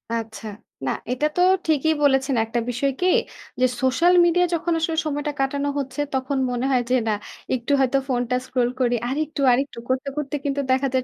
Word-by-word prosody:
আচ্ছা। 220 Hz, -2 st, -5 dB, 0.4 s
না 130 Hz, -, +1 dB, 0.2 s
এটা 255 Hz, +4 st, 0 dB
তো 355 Hz, -, +2 dB, 0.3 s
ঠিকই 315 Hz, 0 st, +2 dB
বলেছেন। 270 Hz, -1 st, +3 dB
একটা 230 Hz, +2 st, -2 dB
বিষয় 250 Hz, +3 st, 0 dB
কি? 365 Hz, -, +3 dB, 0.5 s
যে -, -, +6 dB, 0.2 s
সোশ্যাল 300 Hz, +7 st, +3 dB
মিডিয়ায় 355 Hz, +1 st, +3 dB
যখন 335 Hz, +1 st, -1 dB
আসলে 325 Hz, 0 st, -1 dB
সময়টা 295 Hz, 0 st, -2 dB
কাটানো 280 Hz, +1 st, 0 dB
হচ্ছে, 270 Hz, +1 st, -3 dB
তখন 265 Hz, +1 st, -1 dB
মনে 245 Hz, +1 st, -1 dB
হয় 255 Hz, -2 st, +3 dB
যে, 255 Hz, -, +3 dB
"না 215 Hz, -, +2 dB, 0.4 s
একটু 240 Hz, +2 st, -4 dB
হয়তো 265 Hz, 0 st, +3 dB
ফোনটা 245 Hz, -1 st, 0 dB
স্ক্রল 250 Hz, -2 st, 0 dB
করি।" 245 Hz, -1 st, +2 dB
আরেকটু, 295 Hz, +3 st, -2 dB
আরেকটু 265 Hz, 0 st, 0 dB
করতে, 260 Hz, +2 st, 0 dB
করতে 295 Hz, -1 st, -3 dB
কিন্তু 280 Hz, 0 st, 0 dB
দেখা 260 Hz, +1 st, +2 dB
যায় 260 Hz, -1 st, +1 dB
270 Hz, 185 wpm, -23 LUFS, 250-295 Hz, 0.5 s, যে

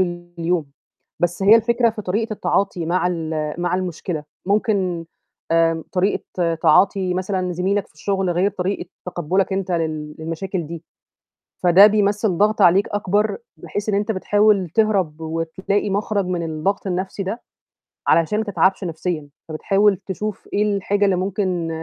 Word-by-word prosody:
ال 175 Hz, -1 st, -3 dB
اليوم، 165 Hz, -2 st, 0 dB, 0.5 s
بس 175 Hz, +2 st, 0 dB
هي 205 Hz, +3 st, +8 dB
الفكرة 235 Hz, +1 st, +2 dB
في 215 Hz, -1 st, -7 dB
طريقة 215 Hz, +4 st, -1 dB
التعاطي 195 Hz, -4 st, -1 dB
مع 180 Hz, +1 st, +1 dB
ال 160 Hz, -3 st, -2 dB
مع 175 Hz, +1 st, 0 dB
المشكلة، 175 Hz, -3 st, -3 dB, 0.2 s
ممكن 200 Hz, -5 st, 0 dB, 0.5 s
آمم، 165 Hz, -1 st, +2 dB
طريقة 180 Hz, -2 st, 0 dB
تعاطي 185 Hz, +3 st, +3 dB
مثلًا، 185 Hz, -1 st, -1 dB
زميلَك 190 Hz, +3 st, 0 dB
في -, -, -30 dB
الشغل 190 Hz, +3 st, -1 dB
غير 180 Hz, +4 st, +2 dB
طريقة 190 Hz, -2 st, -3 dB, 0.2 s
تقبُلَك 180 Hz, +3 st, 0 dB
أنت 190 Hz, -1 st, -2 dB
لل 155 Hz, -3 st, -2 dB
للمشاكل 165 Hz, +2 st, -4 dB
دي، 165 Hz, +1 st, -7 dB, 0.8 s
فده 180 Hz, +3 st, +8 dB
بيمثّل 205 Hz, -2 st, +1 dB
ضغط 210 Hz, +2 st, +2 dB
عليك 190 Hz, +2 st, +5 dB
أكبر، 205 Hz, +1 st, 0 dB, 0.2 s
بحيث 205 Hz, +1 st, -4 dB
إن 205 Hz, -, +1 dB
أنت 205 Hz, +2 st, 0 dB
بتحاول 205 Hz, -1 st, +2 dB
تهرب 190 Hz, -6 st, +1 dB
وتلاقي 165 Hz, +6 st, -2 dB
مَخرَج 200 Hz, 0 st, 0 dB
من 180 Hz, -1 st, -2 dB
الضغط 165 Hz, +6 st, -2 dB
النَفْسي 190 Hz, +2 st, -3 dB
ده، 205 Hz, +6 st, -4 dB, 0.7 s
علشان 170 Hz, +6 st, +3 dB
ما 220 Hz, -, -1 dB
تتعبش 190 Hz, -1 st, +1 dB
نَفْسيًا، 165 Hz, -3 st, -3 dB, 0.2 s
فبتحاول 195 Hz, +5 st, +2 dB
تشوف 205 Hz, +2 st, -5 dB
إيه 205 Hz, -, +2 dB
الحاجة 205 Hz, +1 st, +1 dB
اللي 195 Hz, -2 st, +3 dB
ممكن 185 Hz, -2 st, -1 dB
185 Hz, 145 wpm, -21 LUFS, 170-205 Hz, 0.8 s, هي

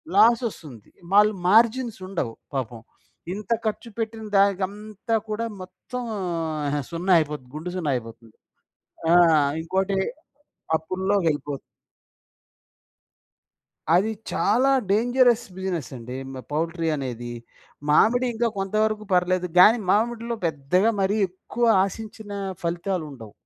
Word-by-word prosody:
Loss 230 Hz, +3 st, +6 dB
ఒస్తుంది. 130 Hz, -, -13 dB, 0.2 s
వాళ్ళు 210 Hz, +1 st, +6 dB
margins 230 Hz, +2 st, +3 dB
ఉండవు, 150 Hz, -12 st, -3 dB, 0.2 s
పాపం. 120 Hz, -4 st, -4 dB, 0.5 s
ఇంత 210 Hz, +2 st, -7 dB
ఖర్చు 225 Hz, +2 st, -3 dB
పెట్టిన 225 Hz, -1 st, -4 dB
దానికంతా 200 Hz, +3 st, 0 dB
కూడా 220 Hz, +2 st, -2 dB, 0.2 s
మొత్తం 190 Hz, +7 st, -7 dB, 0.9 s
సున్నా 175 Hz, +3 st, -2 dB
అయిపోతుంది. 150 Hz, -4 st, -4 dB
గుండు 170 Hz, +3 st, -5 dB
సున్నా 160 Hz, -6 st, -1 dB
అయిపోతుంది. 115 Hz, -1 st, -8 dB, 0.8 s
ఆ! -, -, +6 dB, 0.5 s
ఇంకోటి 190 Hz, +3 st, 0 dB, 0.8 s
అప్పుల్లోకెళ్ళిపోతుంది. 165 Hz, -4 st, -1 dB, 2.4 s
అది 210 Hz, +5 st, +3 dB, 0.2 s
చాలా 255 Hz, +6 st, +3 dB, 0.2 s
డేంజరస్ 245 Hz, +2 st, +3 dB
బిజినెస్ 180 Hz, -9 st, -3 dB
అండి. 125 Hz, +2 st, -7 dB, 0.2 s
మ్ 130 Hz, -, -6 dB
పౌల్ట్రీ 165 Hz, +2 st, -1 dB
అనేది. 120 Hz, -3 st, -5 dB, 0.6 s
మామిడి 245 Hz, +11 st, +4 dB
ఇంకా 235 Hz, +1 st, +1 dB
కొంత 195 Hz, +1 st, -3 dB
వరకు 215 Hz, -1 st, -2 dB
పర్లేదు 180 Hz, 0 st, +2 dB
గాని, 225 Hz, +5 st, +8 dB
మామిడిలో 235 Hz, +2 st, 0 dB
పెద్దగా 165 Hz, +8 st, +2 dB
మరి 200 Hz, +3 st, +1 dB
ఎక్కువ 235 Hz, +6 st, -3 dB, 0.2 s
ఆశించిన 215 Hz, +1 st, -8 dB, 0.3 s
ఫలితాలుండవు. 170 Hz, -, -3 dB
190 Hz, 100 wpm, -24 LUFS, 155-220 Hz, 2.4 s, గాని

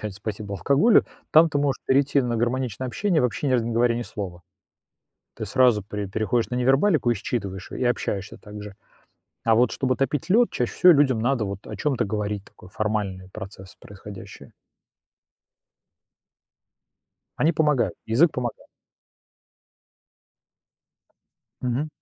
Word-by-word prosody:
опять 105 Hz, -2 st, -5 dB
спасибо 105 Hz, 0 st, -6 dB
алкоголю, 145 Hz, -, +4 dB, 0.3 s
там 160 Hz, +1 st, +6 dB
ты 145 Hz, -, -1 dB
можешь 140 Hz, -2 st, 0 dB
перейти 140 Hz, +1 st, +3 dB
на 120 Hz, -1 st, -1 dB
гармоничное 125 Hz, +1 st, -1 dB
общение, 175 Hz, -, 0 dB
вообще 125 Hz, +3 st, -1 dB
ни -, -, +1 dB
раза 120 Hz, -3 st, +2 dB
не 120 Hz, -, -2 dB
говоря 115 Hz, 0 st, +2 dB
ни 120 Hz, -, -2 dB
слова. 95 Hz, -6 st, -7 dB, 0.9 s
Ты -, -, -5 dB
сразу 120 Hz, -1 st, +3 dB
пре 105 Hz, 0 st, -5 dB
переходишь 110 Hz, +4 st, -1 dB
на 125 Hz, -, -3 dB
невербалику 135 Hz, +2 st, +3 dB
и -, -, +3 dB
считываешь 100 Hz, -3 st, -5 dB
её, -, -, -6 dB
и 125 Hz, -, +1 dB
общаешься 100 Hz, -4 st, -2 dB
так 105 Hz, 0 st, -10 dB
же. 105 Hz, -1 st, -9 dB, 0.7 s
А 115 Hz, -, +4 dB
вот 120 Hz, +3 st, +3 dB
чтобы 130 Hz, -1 st, 0 dB
топить 145 Hz, +6 st, -2 dB
лёд, 235 Hz, +4 st, +4 dB
чаще 125 Hz, -, -2 dB
всего 180 Hz, -, +6 dB
людям 140 Hz, -6 st, +3 dB
надо 120 Hz, -1 st, +1 dB
вот 100 Hz, -1 st, -6 dB
о -, -, -7 dB
чём-то 140 Hz, -4 st, 0 dB
говорить, 105 Hz, -1 st, -3 dB
такой 90 Hz, -, -17 dB
формальный 105 Hz, -3 st, -3 dB
процесс 95 Hz, -1 st, -10 dB
происходящее. 100 Hz, -1 st, -11 dB, 2.8 s
Они 160 Hz, +3 st, +2 dB
помогают, 150 Hz, -4 st, +1 dB
язык 140 Hz, +9 st, +4 dB
помогает. 120 Hz, -2 st, -4 dB, 2.9 s
Мгм. 125 Hz, +4 st, -1 dB
120 Hz, 140 wpm, -24 LUFS, 105-135 Hz, 2.9 s, там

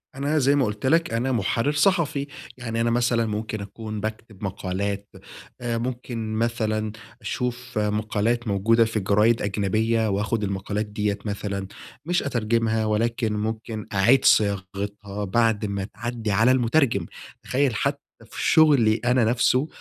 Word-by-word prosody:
أنا 145 Hz, +3 st, 0 dB
زي 140 Hz, +2 st, +3 dB
ما 135 Hz, -3 st, +3 dB
قُلت 105 Hz, +3 st, -4 dB
لك 165 Hz, +3 st, +2 dB
أنا 125 Hz, +3 st, 0 dB
مُحرِّر 115 Hz, +4 st, +1 dB
صحفي، 150 Hz, -3 st, +1 dB, 0.3 s
يعني 115 Hz, -2 st, -3 dB
أنا 115 Hz, -, +2 dB
مثلًا 120 Hz, -1 st, +2 dB
ممكن 110 Hz, 0 st, -3 dB
أكون 105 Hz, +1 st, -6 dB
باكتب 110 Hz, -1 st, -6 dB
مقالات، 100 Hz, +1 st, -3 dB, 0.5 s
آآ 120 Hz, -1 st, -1 dB
ممكن 120 Hz, -2 st, -4 dB
مثلًا 110 Hz, -1 st, -1 dB, 0.3 s
أشوف 125 Hz, -1 st, -4 dB
مقالات 110 Hz, +3 st, 0 dB
موجودة 110 Hz, +3 st, +3 dB
في 110 Hz, -1 st, -2 dB
جرايد 105 Hz, +4 st, +3 dB
أجنبية، 110 Hz, +3 st, 0 dB
وآخد 105 Hz, +2 st, -1 dB
المقالات 100 Hz, +2 st, -2 dB
ديّة 105 Hz, -1 st, -2 dB
مثلًا، 100 Hz, -2 st, -3 dB, 0.4 s
مش 175 Hz, +1 st, +1 dB
أترجمها، 115 Hz, -3 st, 0 dB
ولكن 110 Hz, +1 st, 0 dB
ممكن 110 Hz, +1 st, -4 dB
أعيد 120 Hz, +7 st, +4 dB
صياغتها 100 Hz, 0 st, +1 dB
بعد 110 Hz, +1 st, +1 dB
ما 100 Hz, -1 st, -3 dB
تعدّي 115 Hz, 0 st, -4 dB
على 115 Hz, +6 st, +4 dB
المُترجم، 120 Hz, -, +2 dB, 0.4 s
تخيّل 130 Hz, -2 st, +1 dB
حتى 140 Hz, +5 st, 0 dB, 0.3 s
في -, -, -8 dB
شُغلي 140 Hz, -9 st, +5 dB
أنا 125 Hz, -1 st, +3 dB
نفسه 125 Hz, +4 st, +2 dB
110 Hz, 135 wpm, -24 LUFS, 105-120 Hz, 0.5 s, شُغلي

